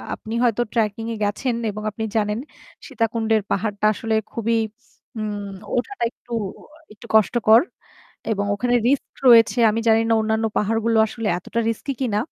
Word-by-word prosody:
আপনি 220 - -8
হয়তো 240 -1 +2
ট্র্যাকিং 225 -1 0
এ - - -4
গেছেন 230 +4 -1 0.2
এবং 215 +1 -7
আপনি 220 +2 -5
জানেন 210 0 0 0.5
সীতাকুণ্ডের 225 -1 0
পাহাড়টা 205 0 -1
আসলে 225 0 -2 0.2
খুবই 230 0 -1 0.6
হুম 215 -1 -3 0.4
ওঠাটা 250 +5 -2
একটু 240 - -23 0.6
একটু 215 - -15
কষ্টকর। 220 +2 +5 0.7
এবং 200 -1 -2
ওখানে 245 +3 0
রিস্ক 275 +1 0
রয়েছে। 235 +1 +6
আমি 225 - -1
জানি 225 0 +5
না - - +4
অন্যান্য 220 +1 0
পাহাড়গুলো 225 +2 +1
আসলে 225 -1 -4
এতটা 230 +6 -4
রিস্কি 230 +5 -3
কিনা। 220 -5 0
225 Hz, 145 wpm, -22 LUFS, 215-230 Hz, 0.7 s, রয়েছে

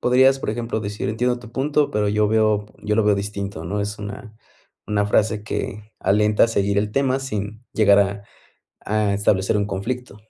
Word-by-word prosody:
Podrías, 130 +2 +4
por 135 - -3
ejemplo, 115 0 -3
decir: 105 0 -4
"Entiendo 125 +3 0
tu 120 -2 -12
punto, 145 +3 +1
pero 105 -1 0
yo 105 0 +2
veo 110 -1 +2 0.2
yo 105 0 0
lo 110 - +3
veo 105 - +4
distinto", 100 -4 -4
¿no? 100 +5 -2
Es 105 +1 -4
una 105 +1 -8 0.5
una 105 -1 +1
frase 105 0 +1
que 105 +1 -5
alienta 105 +2 +3
a - - 0
seguir 100 -2 0
el 105 0 0
tema 135 -1 +1
sin 105 -2 -5
llegar 100 -2 +5
a 100 0 -1 0.6
a 105 -1 +1
establecer 100 0 +1
un 100 -1 0
conflicto. 105 +4 -4
105 Hz, 185 wpm, -22 LUFS, 100-115 Hz, 0.6 s, llegar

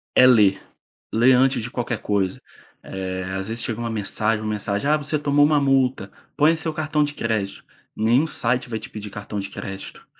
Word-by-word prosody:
É 130 - +8
ler, 105 -6 +5 0.5
ler 120 +4 +5
antes 130 -1 +3
de 120 - -6
qualquer 120 -2 -3
coisa. 100 -3 -1 0.4
Eh, 95 -1 -4
às 95 +1 -4
vezes 115 +1 -3
chega 115 -1 -3
uma 120 0 -3
mensagem 110 0 -1
uma 110 - -2
mensagem: 105 +4 -1
"Ah, 155 - +4
você 150 +1 -2
tomou 145 0 +3
uma 150 -1 +3
multa, 130 -7 +1 0.2
põe 150 +3 +4
o 165 - -3
seu 160 -1 -3
cartão 150 -1 0
de 145 0 -3
crédito", 110 -7 -3 0.3
nenhum 120 +8 +2
site 125 -3 -1
vai 110 - -2
te 110 - -9
pedir 105 -1 -7
cartão 105 +1 -6
de 100 0 -5
crédito. 95 0 -8
115 Hz, 200 wpm, -22 LUFS, 105-140 Hz, 0.5 s, É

